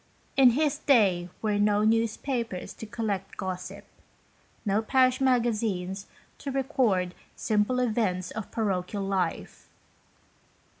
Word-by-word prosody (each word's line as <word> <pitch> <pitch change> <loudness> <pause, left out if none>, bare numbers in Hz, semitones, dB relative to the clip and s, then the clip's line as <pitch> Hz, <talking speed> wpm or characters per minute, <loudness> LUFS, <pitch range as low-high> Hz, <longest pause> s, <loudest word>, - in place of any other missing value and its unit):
In 255 -3 +6
his 300 -1 +1
day 195 - +3
were 210 -1 +1
no 205 0 +3
newspapers 225 -1 -1
to 220 - -9
collect 210 -4 -3
gossip, 185 -2 -5 0.8
no 205 +1 +2
Parish 255 +3 +3
Magazines 215 -7 0 0.3
to 280 - -4
record 255 -9 +1
the - - -24 0.2
simple 215 +3 +1
events 215 -7 0
of 220 -2 -6
parochial 200 -2 -2
life. 190 -4 -3
215 Hz, 110 wpm, -27 LUFS, 195-245 Hz, 0.8 s, In